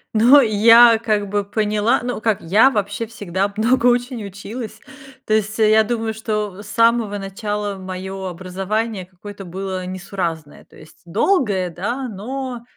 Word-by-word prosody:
Но, 245 +6 +7
я, 230 +1 +6
как 210 -2 -1
бы, 205 +1 -1
поняла, 210 +3 0
ну, 245 -3 -4
как 220 -2 +1
я, 210 +10 +4
вообще, 210 -1 -3
всегда 200 -3 -3
много 240 +3 +2
очень 245 -1 0
училась, 215 +3 -8 0.5
то 215 - 0
есть, 215 +1 0
э, 215 -1 +4
я 220 0 +5
думаю, 225 0 -2
что 210 -3 -4
с 205 - -12
самого 230 -2 +2
начала 205 +1 -4
моё 190 +1 -6
образование, 190 +3 -3
какое-то 195 +2 -11
было 185 0 -5
несуразное. 180 -5 -5
То - - -20
есть 155 - -17
долгое, 200 - +1
да, 235 +10 -4
но 245 +3 -6
210 Hz, 150 wpm, -20 LUFS, 195-230 Hz, 0.5 s, Но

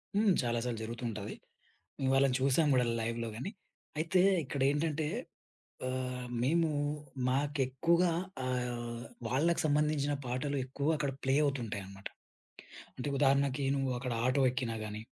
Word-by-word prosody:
హ్మ్. 210 0 +4
చాలా 120 -2 0
సార్లు 115 -3 -2
జరుగుతూ 115 +2 -6
ఉంటది. 105 -1 -5 0.7
మేము 130 -1 +1
వాళ్ళని 135 -1 +4
చూసాం 140 +3 +3
గూడా 125 -2 +4 0.2
లైవ్‌లో 115 0 -2
గాని. 130 - -4 0.5
అయితే 165 +3 +2 0.2
ఇక్కడేంటంటే, 145 +3 +1 0.8
ఆహ్, 125 -1 -3
మేము 165 +4 +3 0.6
మాకెక్కూగా 145 +5 +2 0.3
ఆహ్, 120 -2 -2 0.3
వాళ్ళకి 160 +7 +2
సంబంధించిన 150 -1 +2
పాటలు 140 +4 -1
ఎక్కువగా 140 +4 0
అక్కడ 140 -3 -1
ప్లే 135 0 +3
అవుతుంటాయన్నమాట. 100 -8 -3 0.9
అంటే 130 +3 -3
ఉదాహరణకి 140 0 +3
నువ్వు 135 -1 0
అక్కడ 125 -1 -3
ఆటో 135 +1 +3
ఎక్కినా 125 -3 -2
గాని, 105 0 -5
135 Hz, 125 wpm, -32 LUFS, 120-145 Hz, 0.9 s, హ్మ్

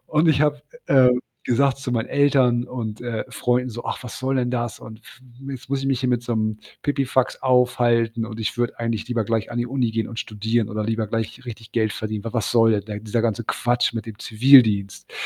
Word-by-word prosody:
Und 155 +2 +2
ich 150 -2 +3
habe, 150 -1 +2 0.3
äh, 130 -2 +6 0.4
gesagt 135 +2 +2
zu 135 -2 -5
meinen 115 -2 -1
Eltern 130 -4 +3
und, 115 -3 -6
äh, 115 -2 -3
Freunden 125 +1 0
so: 120 0 -7
„Ach, - - -4
was 125 - -8
soll 135 0 -1
denn 125 -1 0
das? 120 -2 -3
Und 110 0 -11
f 120 - -17 0.3
jetzt 130 -1 -8
muss 135 -1 -1
ich 135 - -3
mich 135 -2 +1
hier 130 - 0
mit 120 -1 +1
so 120 -1 -2
'nem 110 -1 -1 0.2
Pipifax 135 -3 0
aufhalten 120 -3 +2
und 110 0 -7
ich 110 - -2
würde 120 -1 -1
eigentlich 115 -1 -2
lieber 115 -3 0
gleich 115 0 -1
an 120 - -3
die 120 - 0
Uni 125 -2 0
gehen 110 0 -2
und 115 0 -8
studieren 110 +1 -1
oder 105 0 -2
lieber 110 0 -1
gleich 115 +3 -4
richtig 110 -2 -9
Geld 110 -3 +1
verdienen. 110 -1 -4
W - - -3
w - - -9
was 115 -5 -1
soll 115 -1 +5
denn 100 -2 -1
der 105 -1 -5
dieser 110 +2 -1
ganze 115 0 -1
Quatsch 120 +2 0
mit 115 -1 -5
dem 110 -1 -9
Zivildienst?“ 110 -5 +4
120 Hz, 230 wpm, -22 LUFS, 110-125 Hz, 0.4 s, äh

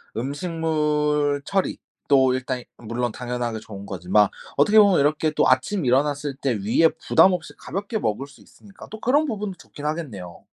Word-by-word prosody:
음식물 150 0 0
처리도 140 -8 0
일단 130 -1 -3
물론 120 +1 -3
당연하게 120 -2 -4
좋은 100 -2 -10
거지만 95 +2 +2 0.3
어떻게 210 +10 +5
보면 200 -6 +5
이렇게 155 +2 +1
또 150 - +2
아침에 130 +5 +1
일어났을 145 +2 +1
때 135 -1 -1
위에 110 +10 +3 0.2
부담 185 +3 +6
없이 175 -3 -5
가볍게 200 +4 -4
먹을 115 - -2
수 140 - -18
있으니까 200 -1 -16
또 220 - -8
그런 285 +7 +2
부분도 210 -7 -4
좋긴 145 -2 -11
하겠네요. 120 - -5
145 Hz, 365 characters per minute, -23 LUFS, 125-165 Hz, 0.3 s, 부담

